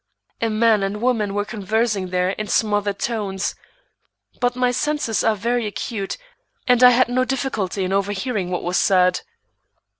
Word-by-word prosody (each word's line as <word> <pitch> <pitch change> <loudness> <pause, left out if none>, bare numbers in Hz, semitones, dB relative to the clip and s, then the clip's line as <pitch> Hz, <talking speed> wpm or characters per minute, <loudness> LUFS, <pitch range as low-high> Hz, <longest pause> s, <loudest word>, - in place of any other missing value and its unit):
A 230 - +1
man 220 -1 +3
and 195 +2 -2
woman 220 -4 0
were 205 0 0
conversing 215 -1 -1
there 180 0 0
in 210 +2 -5
smothered 205 -1 0
tones, 200 -5 -2 0.9
but 245 0 +1
my 250 0 +1
senses 290 -3 -1
are 220 -1 +2
very 235 +2 -1
acute, 205 -1 -4 0.5
and 250 -1 +4
I 250 - +10
had 250 +1 +4
no 250 +1 +1
difficulty 245 -8 -2
in 185 +1 -1
overhearing 200 0 -1
what 180 - -3
was 175 +1 0
said. 180 -1 +3
215 Hz, 155 wpm, -21 LUFS, 195-245 Hz, 0.9 s, I